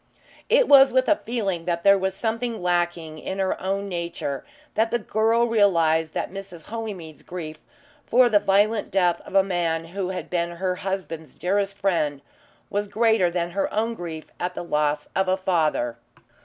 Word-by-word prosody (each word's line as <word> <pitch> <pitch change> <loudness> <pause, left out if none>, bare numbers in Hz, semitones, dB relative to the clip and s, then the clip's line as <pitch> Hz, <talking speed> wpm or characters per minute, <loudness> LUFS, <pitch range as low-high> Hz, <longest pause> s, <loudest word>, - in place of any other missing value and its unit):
It - - +5
was 275 -1 +8
with 260 +1 +2
a 310 - +4
feeling 200 -8 -2
that 170 -1 -1
there 200 0 +7
was 190 0 -1
something 230 +2 -2
lacking 175 -3 -1
in 190 - -5
her 190 -1 -1
own 195 +1 -2
nature, 170 -6 -4 0.3
that 225 +1 +2
the 240 - +1
girl 225 +1 +2
realised 165 -8 +2
that - - -2
Mrs. 195 -5 -9
Holymead's 205 -9 -6
grief 160 -3 -7 0.5
for 245 +1 +5
the 215 -3 +4
violent 205 +2 +2
death 180 -3 +2
of - - -10
a 195 - +6
man 170 -3 -1
who 190 -2 -2
had 185 - -4
been 170 -1 -1
her 180 +1 -2
husband's 185 -5 -5
dearest 200 +2 -1
friend 155 -8 0 0.5
was 205 +1 -1
greater 220 -4 +3
than 170 0 -2
her 195 +2 -1
own 225 +2 0
grief 165 -6 -7
at 180 +1 -3
the - - -4
loss 150 -2 0
of 190 0 +1
a 185 0 +2
father. 155 -11 0
190 Hz, 175 wpm, -24 LUFS, 170-205 Hz, 0.5 s, was